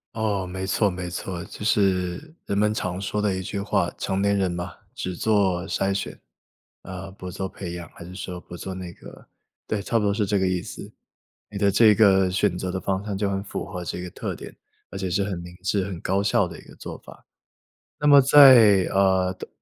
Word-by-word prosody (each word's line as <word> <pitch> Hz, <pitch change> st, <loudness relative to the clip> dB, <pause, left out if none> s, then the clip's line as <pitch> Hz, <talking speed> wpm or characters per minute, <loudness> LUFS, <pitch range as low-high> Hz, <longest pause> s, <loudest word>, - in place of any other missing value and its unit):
哦， 105 Hz, -4 st, -1 dB
没 95 Hz, +1 st, -5 dB
错 100 Hz, +2 st, +2 dB
没 90 Hz, 0 st, -5 dB
错。 90 Hz, 0 st, -5 dB
就 105 Hz, -, -9 dB
是 100 Hz, -, 0 dB
人 100 Hz, -, -2 dB
们 105 Hz, +1 st, +2 dB
常 90 Hz, -3 st, -3 dB
说 105 Hz, +2 st, -2 dB
的 105 Hz, -2 st, +1 dB
一 95 Hz, -, -3 dB
句 100 Hz, +2 st, -4 dB
话， 95 Hz, -3 st, 0 dB
成 95 Hz, 0 st, -1 dB
年 100 Hz, 0 st, +2 dB
人 95 Hz, -2 st, +1 dB
嘛， 85 Hz, 0 st, -5 dB, 0.2 s
只 90 Hz, -1 st, -4 dB
做 95 Hz, -4 st, +1 dB
筛 95 Hz, +1 st, 0 dB
选， 95 Hz, -, -4 dB, 0.6 s
嗯， 95 Hz, +1 st, -8 dB
不 90 Hz, 0 st, -7 dB
做 95 Hz, +2 st, -4 dB
培 95 Hz, -2 st, -7 dB
养， 85 Hz, -1 st, -7 dB
还 -, -, -10 dB
是 90 Hz, +2 st, -10 dB
说 90 Hz, -1 st, -6 dB
不 90 Hz, -, -10 dB
做 95 Hz, +2 st, -6 dB
那 90 Hz, -1 st, -7 dB
个 -, -, -14 dB, 0.4 s
对， 105 Hz, -2 st, -2 dB
差 115 Hz, -, 0 dB
不 -, -, -1 dB
多 100 Hz, -, +2 dB
是 105 Hz, 0 st, 0 dB
这 100 Hz, +1 st, +1 dB
个 95 Hz, -, +1 dB
意 90 Hz, -1 st, 0 dB
思。 -, -, -9 dB, 0.6 s
你 105 Hz, -, -7 dB
的 100 Hz, 0 st, +3 dB
这 105 Hz, +1 st, +6 dB
个 95 Hz, -3 st, +5 dB
选 90 Hz, -1 st, +1 dB
择 95 Hz, 0 st, -3 dB
的 95 Hz, -, -3 dB
方 95 Hz, 0 st, -1 dB
向 100 Hz, -2 st, -3 dB
就 100 Hz, 0 st, 0 dB
很 95 Hz, 0 st, -1 dB
符 100 Hz, -, -5 dB
合 90 Hz, -3 st, -6 dB
这 90 Hz, -, -4 dB
个 90 Hz, -, -6 dB
特 -, -, -5 dB
点， -, -, -10 dB, 0.4 s
而 95 Hz, -, -7 dB
且 95 Hz, -1 st, -2 dB
是 100 Hz, +3 st, +1 dB
很 95 Hz, -3 st, -3 dB
明 90 Hz, 0 st, -10 dB
智 95 Hz, 0 st, 0 dB
很 95 Hz, -3 st, -6 dB
高 95 Hz, +2 st, 0 dB
效 100 Hz, -1 st, +2 dB
的 85 Hz, -2 st, -10 dB
一 -, -, -12 dB
个 -, -, -15 dB
做 -, -, -8 dB
法。 -, -, -15 dB, 0.7 s
那 150 Hz, -, -1 dB
么 145 Hz, -1 st, +9 dB
在， 130 Hz, -8 st, +8 dB
呃 95 Hz, -1 st, +3 dB
的 -, -, -9 dB
95 Hz, 245 characters per minute, -24 LUFS, 90-100 Hz, 0.7 s, 么